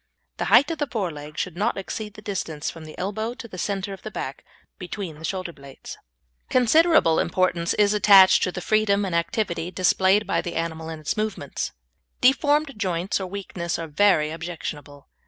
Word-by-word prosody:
The - - -2
height 285 - +5
of 325 - -4
the 295 - 0
fore 200 -8 -2
leg 150 0 -10
should 180 - -3
not 210 +5 0
exceed 210 +2 -5
the 215 - -12
distance 165 -7 -3
from 165 -1 -11
the 155 - -11
elbow 220 +5 -3
to 240 - -9
the 185 -4 -9
centre 195 0 -2
of 195 - -10
the 215 - -6
back, 140 -8 -6 0.4
between 180 -4 -6
the - - -12
shoulder 185 0 -3
blades. 140 -2 -11 0.5
Considerable 255 - +4
importance 175 -1 +1
is 205 0 +3
attached 200 -2 +7
to 180 - +1
the 180 - -6
freedom 205 0 +2
and 185 - -4
activity 170 0 -1
displayed 190 +3 +3
by 195 - 0
the 175 - -6
animal 165 -1 -3
in 160 -1 -6
its 155 - -2
movements. 215 -10 -3 0.5
Deformed 290 +3 +3
joints, 185 -2 -1
or 190 - -4
weakness, 180 -3 -4
are 165 - -4
very 155 -1 +3
objectionable. 155 -4 -7
185 Hz, 185 wpm, -24 LUFS, 165-210 Hz, 0.5 s, attached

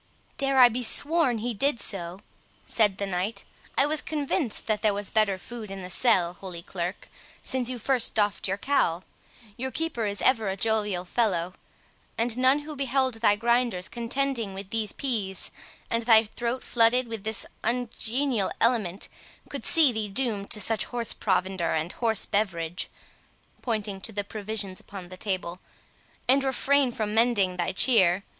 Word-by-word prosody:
"I - - -36
dare 270 -3 +6
be 250 +3 -2
sworn 285 +1 +2
he 235 +2 -3
did 275 +3 +1
so," 175 -4 -2 0.5
said 210 -4 +2
the 200 - -2
knight; 195 +2 -2 0.3
"I 275 - +5
was 305 +1 -1
convinced 290 - -2
that 215 -2 0
there 210 -2 +2
was 205 -1 -3
better 215 -3 +2
food 220 +3 -9
in 195 -1 -7
the 180 - -6
cell, 180 -5 +3
Holy 180 -2 -8
Clerk, 175 +1 -5 0.4
since 255 -2 0
you 255 - -4
first 250 +1 0
doffed 205 -2 +1
your 195 +1 -1
cowl.—Your 220 +1 -3
keeper 260 -7 -2
is 205 0 -2
ever 225 -6 +3
a 190 - -3
jovial 210 -4 0
fellow; 185 -4 0 0.6
and 230 0 +3
none 255 +2 +4
who 300 0 -8
beheld 265 -1 0
thy 205 -3 +5
grinders 235 -4 +1
contending 235 -2 -2
with 195 0 -8
these 220 -3 0
pease, 210 -9 -3 0.4
and 230 - -1
thy 225 -2 +8
throat 235 +3 -4
flooded 240 +1 +3
with 225 -3 -5
this 220 -1 +1 0.2
ungenial 240 0 0
element, 215 -6 +1 0.4
could - - -6
see 315 -6 +5
thee 220 -2 -3
doomed 205 -2 -1
to 215 - +3
such 220 +1 +3
horse 240 -2 -1
provender 185 -3 -1
and 160 +3 -2
horse 225 -3 +2
beverage," 175 -4 -2 0.7
(pointing 210 -5 -3
to 225 - -1
the 205 -1 -2
provisions 205 -2 -5
upon 190 -3 -10
the 185 - -9
table,) 185 -3 -3 0.7
"and 270 +2 +4
refrain 270 0 +2
from 215 -2 -3
mending 215 -5 +2
thy 175 +1 -1
cheer. 190 -3 +4
220 Hz, 165 wpm, -26 LUFS, 195-245 Hz, 0.7 s, thy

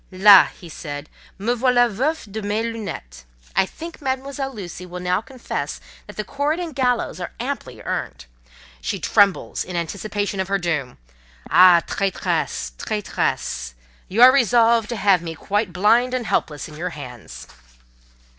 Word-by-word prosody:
"Là!" 195 +1 +8 0.2
said 145 -2 -7 0.3
he: 195 - -11
"me 240 - +3
voilà 245 0 +3
veuf 265 +9 -1
de 220 +2 -4
mes 210 +2 -1
lunettes! 200 - -6 0.3
I 190 - +3
think 330 - -9
Mademoiselle 270 0 -3
Lucy 185 -6 -8
will 180 0 -7
now 180 +2 0
confess 255 +1 -5 0.3
that - - -11
the 215 - -2
cord 285 +7 -1
and 340 -3 -4
gallows 250 -3 0
are - - -6
amply - - -5
earned; 60 +1 -4 0.6
she - - -3
trembles 200 -2 +2
in 180 - -7
anticipation 200 +4 -3
of 190 - -1
her 195 0 +1
doom. 160 -8 -2 0.5
Ah, 180 -2 +7
traitress! 185 - -1
traitress! 65 - -2 0.3
You 225 +6 +4
are 255 - +10
resolved 235 -3 +3
to 240 - -2
have 195 -4 +3
me 165 -1 -6
quite 205 +4 -1
blind 230 +8 +3
and 250 -2 -2
helpless 150 -8 -1
in 150 - -12
your 180 +3 -3
hands!" 125 - -10
205 Hz, 155 wpm, -22 LUFS, 175-245 Hz, 0.6 s, are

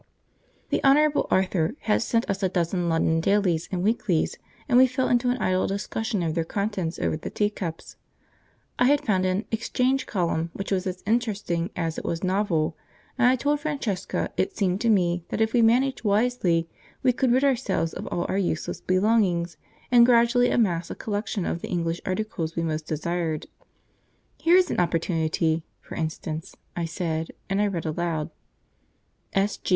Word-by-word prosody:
The - - 0
Honourable 295 +2 +4
Arthur 185 - +1
had 215 - +1
sent 230 0 0
us 195 0 -2
a 190 - +2
dozen 175 0 0
London 165 0 +2
dailies 180 -3 +1
and 180 -2 -1
weeklies, 210 -6 +1 0.3
and 245 - +5
we 260 - +7
fell 255 +1 -1
into 245 0 +2
an 250 - +1
idle 185 -5 +1
discussion 205 0 -2
of 160 -2 -1
their 165 0 0
contents 190 -2 -2
over - - 0
the - - -6
teacups. 200 -6 -3 0.8
I 245 - +5
had 285 +2 +3
found 185 -4 +2
an 185 +4 -1
'exchange 255 +4 0
column' 170 -3 -1
which 195 - -5
was 190 -1 0
as 185 0 -5
interesting 205 -6 0
as 165 -2 -2
it - - -9
was 170 +2 -3
novel, 180 -4 0 0.4
and 250 -1 +4
I 255 - +5
told 290 +4 0
Francesca 275 - -2
it - - -1
seemed 190 -1 0
to 235 - +2
me 175 -4 +2
that - - -3
if 220 0 +1
we 240 - +4
managed 250 +4 +3
wisely 200 -6 +2 0.4
we 255 -1 +4
could 255 0 +1
rid 260 +3 +3
ourselves 250 -11 +1
of - - -6
all 175 - -2
our 195 - 0
useless 175 -4 -2
belongings, 185 -4 +2 0.4
and 240 -1 +7
gradually 240 +1 +4
amass 180 -7 +1
a - - -5
collection 205 -3 -3
of 170 - -2
the - - -6
English 170 -1 -1
articles 185 -4 -2
we 170 - -1
most 155 -1 -3
desired. 160 0 -2 0.9
"Here 340 +2 +4
is 365 -2 +3
an - - -1
opportunity, 165 -2 0 0.2
for - - -12
instance," 160 0 -4 0.2
I 170 - -1
said, 165 -1 -3 0.2
and 195 +1 +2
I 210 - +3
read 175 -5 -3
aloud 160 0 -2 1.0
"'S.G. 195 +1 0
190 Hz, 175 wpm, -25 LUFS, 170-230 Hz, 1.0 s, we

